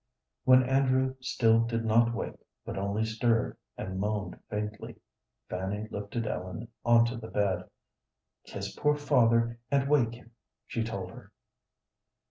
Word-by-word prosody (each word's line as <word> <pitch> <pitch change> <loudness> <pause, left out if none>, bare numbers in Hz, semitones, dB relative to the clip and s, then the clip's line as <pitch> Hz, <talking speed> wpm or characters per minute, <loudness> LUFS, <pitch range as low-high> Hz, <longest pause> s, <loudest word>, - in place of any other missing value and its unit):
When 130 0 +7
Andrew 130 0 +2
still 125 -3 +3
did 115 0 -1
not 115 +1 +4
wake, 115 - -5 0.2
but - - -5
only 100 +3 -1
stirred, 115 +1 +1 0.2
and 95 0 -4
moaned 105 0 -2
faintly, 105 0 -4 0.5
Fanny 95 +4 -3
lifted 105 +3 -3
Ellen 95 +3 -4
onto 120 0 +4
the 110 - -8
bed. 100 -3 0 0.8
"Kiss - - -6
poor 150 0 +2
father, 115 -5 +3
and 140 -1 +2
wake 125 -6 +3
him," 120 0 -16 0.3
she 115 - -2
told 100 -5 -4
her. - - -13
115 Hz, 130 wpm, -29 LUFS, 105-125 Hz, 0.8 s, When